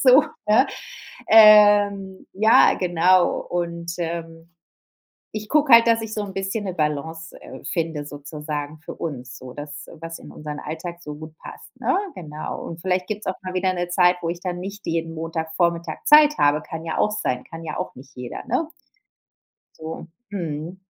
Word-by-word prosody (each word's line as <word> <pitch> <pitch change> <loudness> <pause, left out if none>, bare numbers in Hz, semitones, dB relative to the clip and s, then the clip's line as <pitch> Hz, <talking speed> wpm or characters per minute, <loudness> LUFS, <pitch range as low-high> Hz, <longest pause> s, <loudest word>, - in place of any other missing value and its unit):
so, 260 +2 +8 0.3
ne? 220 +6 +5 0.6
Ähm, 205 -3 +6
ja, 220 +4 +5
genau 180 0 +3
und, 170 -1 -4
ähm, 165 -1 -5 0.9
ich 215 0 -5
gucke 295 -4 +4
halt, 230 0 +8
dass 230 -1 +4
ich 220 -1 -6
so 215 - -2
'n 200 - -6
bisschen 195 +2 -3
'ne 185 - -3
Balance, 160 +1 -3
äh, - - -11
finde 160 -3 -2
sozusagen 150 +1 -6
für 160 - -8
uns 130 -5 -6
so, 125 -1 -10
das, 145 +2 -8
was 165 0 -7
in - - -12
unseren 150 -1 -7
Alltag 165 +3 -6
so 150 -3 -7
gut 155 +1 -10
passt, - - -11
ne? 370 - +1 0.2
Genau. 155 -3 -6
Und 165 0 -8
vielleicht 180 0 0
gibt's 210 0 -5
auch 185 - -1
mal 185 0 -5
wieder 185 0 +1
'ne 175 -1 -2
Zeit, 180 0 +4
wo 165 - -2
ich 170 0 -5
dann 180 -1 -3
nicht 200 +2 -7
jeden 165 0 -2
Montagvormittag 165 +1 -2
Zeit 300 0 +7
habe. 145 +1 +3
Kann 165 0 -7
ja 160 - -3
auch 210 - +3
sein, 125 -12 -2
kann 165 0 -9
ja 155 -2 -5
auch - - -5
nicht 130 +2 -14
jeder, 125 -1 -7
ne? 260 +7 0 1.1
So, 160 +1 -7 0.2
mhm. 165 -1 -4
170 Hz, 175 wpm, -23 LUFS, 155-195 Hz, 1.1 s, so